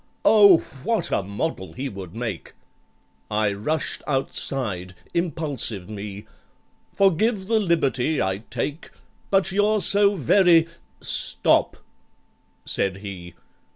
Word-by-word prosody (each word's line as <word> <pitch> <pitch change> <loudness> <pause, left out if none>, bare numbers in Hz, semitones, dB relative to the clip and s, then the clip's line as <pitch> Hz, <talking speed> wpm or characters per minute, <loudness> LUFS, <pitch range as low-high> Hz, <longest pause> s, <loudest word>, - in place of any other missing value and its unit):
"Oh, 200 -5 +7 0.2
what 225 +4 -1
a - - +1
model 100 - -4
he 135 +8 -4
would 95 -6 -8
make!" 115 -6 -5 0.8
I 105 -1 +1
rushed 140 +10 -2
outside—impulsive 135 - -2
me!— 105 -1 -7 0.7
"Forgive 195 +2 +2
the 220 +2 +2
liberty 160 - +1
I 95 0 -1
take, 140 +6 -4 0.4
But 195 -1 +2
you're 210 +2 +2
so 200 +1 +4
very"—"Stop!" 170 - +2 0.9
said 95 -1 -1
he. 90 -3 -8
140 Hz, 95 wpm, -23 LUFS, -, 0.9 s, Oh